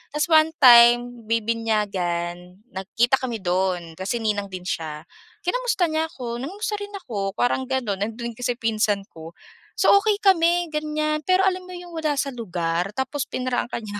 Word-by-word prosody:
ta’s 300 - +2
one 315 0 +6
time 240 -1 +6
bibinyagan, 200 -5 -2
nagkita 230 +7 +1
kami 250 -3 -3
do'n 180 -2 -1
kasi 190 +5 -2
ninang 205 -2 -1
din 185 -1 -7
siya. 155 -4 -4 0.4
Kinamusta 475 -1 0
niya 315 +1 0
ako, 240 -5 -6
nangumusta 405 +9 -3
rin 410 0 -7
ako 200 -5 -4
parang 255 +2 0
gano'n. 245 -7 -2
Nandun 235 +2 -4
kasi 245 +1 -2
pinsan 215 -3 0
ko. 165 +1 -11 0.4
So - - +4
okay 420 0 +1
kami 345 -3 +3
ganiyan, 305 0 -1
pero 370 +1 +4
alam 370 -1 -1
mo 365 - -8
'yong 350 -1 -10
wala 305 -2 0
sa 275 0 -1
lugar 175 -5 -2
tapos 265 +1 -2
pinrangka 250 -1 -2
niya 205 -1 -6
240 Hz, 160 wpm, -23 LUFS, 195-305 Hz, 0.4 s, one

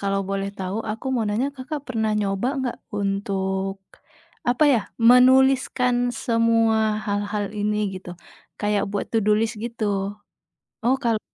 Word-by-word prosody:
kalau 195 0 0
boleh 195 0 -2
tahu 190 +3 -3
aku 225 +5 -6
mau 235 -3 0
nanya, 230 +7 0
Kakak 285 +3 -5
pernah 220 -3 0
nyoba 195 +3 -1
nggak 250 -2 -3 0.2
untuk 195 -1 -1 0.7
apa 250 +5 +3
ya, 230 - +2 0.2
menuliskan 250 +1 +5 0.2
semua 230 -1 +2 0.3
hal-hal 205 0 -1
ini 210 0 0 0.2
gitu? 185 -1 -8 0.5
Kayak 210 -1 +1
buat 205 - -2
to 225 - +3
do 210 - +4
list 225 +1 0
gitu. 235 -1 -4 1.0
Oh 260 +3 +3
kal 225 -2 +1
220 Hz, 140 wpm, -23 LUFS, 200-245 Hz, 1.0 s, menuliskan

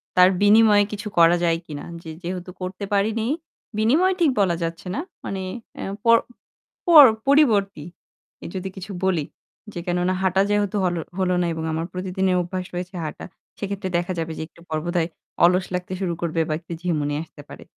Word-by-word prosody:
তার 180 0 +7
বিনিময়ে 205 0 +6
কিছু 210 0 -5
করা 170 +1 +7
যায় 165 -1 +2
কিনা। 145 -2 -7 0.2
যে, 160 - -8
যেহেতু 180 +1 -5
করতে 185 +2 -5
পারিনি 220 +3 +1 0.5
বিনিময়ে 315 +13 +3
ঠিক 310 - +5
বলা 180 -4 +3
যাচ্ছে 165 +2 -5
না। - - -2 0.3
মানে 195 -1 -3 0.4
এ - - -4 0.2
পর 230 0 +7 0.7
পর 315 -5 +10 0.2
পরিবর্তী 205 - +3 0.7
যদি 190 +1 -3
কিছু 190 +2 -7
বলি 175 -6 +1 0.5
যে - - -5
কেননা 180 +1 +1
হাঁটা 190 0 +2
যেহেতু 205 0 +1
হল 175 -1 0 0.2
হল 185 -1 +1
না - - +1
এবং 160 0 -4
আমার 165 +1 -2
প্রতিদিনের 185 0 0
অভ্যাস 185 +1 -4
রয়েছে 180 +1 -5
হাঁটা। 150 - -6 0.3
সেক্ষেত্রে 200 -2 -3
দেখা 175 +2 -2
যাবে 165 0 -3
যে - - -4
একটু 170 - -21
পর 155 - -1
বোধহয় 175 -1 0 0.4
অলস 180 +1 +3
লাগতে 180 +1 -4
শুরু 175 -3 0
করবে 165 -1 -1
বা - - +1
একটু 170 - -14
ঝিমুনি 150 -5 -1
আসতে 155 -2 -14
পারে। - - -10
185 Hz, 175 wpm, -23 LUFS, 170-200 Hz, 0.7 s, পর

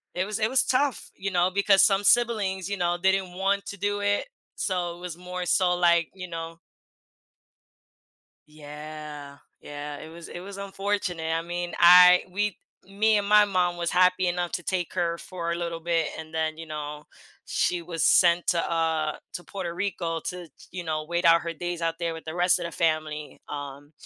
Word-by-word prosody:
it 185 +1 0
was 210 +1 -4
it 215 +1 +1
was 260 0 +3
tough, 265 -1 0
you 195 +1 -3
know, 180 +1 +2
because 200 0 +4
some 195 -1 +3
siblings, 205 -5 +2
you 200 - -2
know, 175 0 0
they 190 0 +4
didn't 190 -2 -2
want 195 +2 0
to 200 - -6
do 205 +1 -1
it, 205 - 0 0.3
so 175 -3 -2
it - - -15
was 175 -2 -6
more 180 0 -5
so, 180 0 +3
like, 170 -2 +3
you 180 -1 -7
know 165 0 -6 1.9
Yeah, 150 -1 -9 0.2
yeah, 145 0 -7
it 160 - -10
was 170 +1 -11
it 175 - -7
was 200 +2 -9
unfortunate, 195 -4 -2
I 165 - 0
mean, 175 0 -4
I 180 +1 +8
we 205 +1 -2 0.3
me 210 +2 +2
and 200 0 -1
my 210 0 +6
mom 180 -3 0
was 170 -1 -1
happy 185 0 +3
enough 175 0 -1
to 175 - -3
take 180 -3 -2
her 170 -2 -1
for 170 -2 -5
a - - 0
little 170 -1 -4
bit 165 -1 0
and 160 0 -9
then, 160 -1 -1
you 165 - -8
know, 150 -1 -6 0.4
she 175 -1 0
was 165 -1 -3
sent 175 -1 +5
to, 170 -1 +1
uh, 160 -2 0 0.2
to 175 - -6
Puerto 180 -4 -5
Rico 175 -3 -2
to, 180 -2 -6
ch - - -19
you 180 -1 -5
know, 155 -1 -2
wait 170 +2 -2
out 170 0 +6
her 170 - -4
days 175 +1 -5
out 165 0 0
there 170 -1 -2
with 160 - -10
the 160 +2 -6
rest 180 0 +3
of - - -4
the 170 - -5
family, 155 -2 -2
um, 145 0 -7
175 Hz, 200 wpm, -26 LUFS, 165-190 Hz, 1.9 s, I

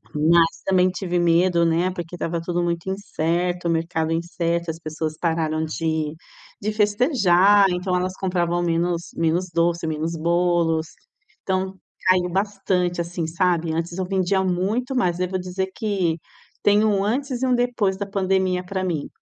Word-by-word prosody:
mas 165 +2 +3
também 185 -1 +3
tive 180 -1 -2
medo, 170 0 +3
né, 170 +3 +2
porque 175 -1 -6
estava 170 -1 -3
tudo 175 +1 -1
muito 170 +1 -2
incerto, 175 -2 -1
o - - +2
mercado 165 -1 -1
incerto, 170 0 -1
as 160 - -9
pessoas 155 -1 -4
pararam 160 -2 0
de 160 -1 -2 0.5
de 215 +1 -1
festejar, 205 - +4
então 180 +1 -2
elas 185 +1 -1
compravam 175 -2 0
menos 170 0 -1
menos 170 +2 +1
doce, 170 0 +1
menos 160 +2 -2
bolos, 170 -1 +1 0.6
então 190 0 -2 0.3
caiu 180 -1 +4
bastante, 190 -3 0
assim, 170 -1 -3
sabe. 170 -1 0
Antes 170 +2 -3
eu 185 - -1
vendia 190 0 +1
muito 205 +9 -1
mais, 180 -7 +1
eu 185 - 0
vou 190 - -1
dizer 190 +1 -3
que 190 -7 0 0.5
tem 205 +1 +4
um 200 -2 +2
antes 255 +4 -1
e - - +2
um 255 - +3
depois 240 -6 0
da 200 - -3
pandemia 190 -2 0
para 190 +1 -3
mim. 165 -6 -3
180 Hz, 160 wpm, -23 LUFS, 165-190 Hz, 0.6 s, festejar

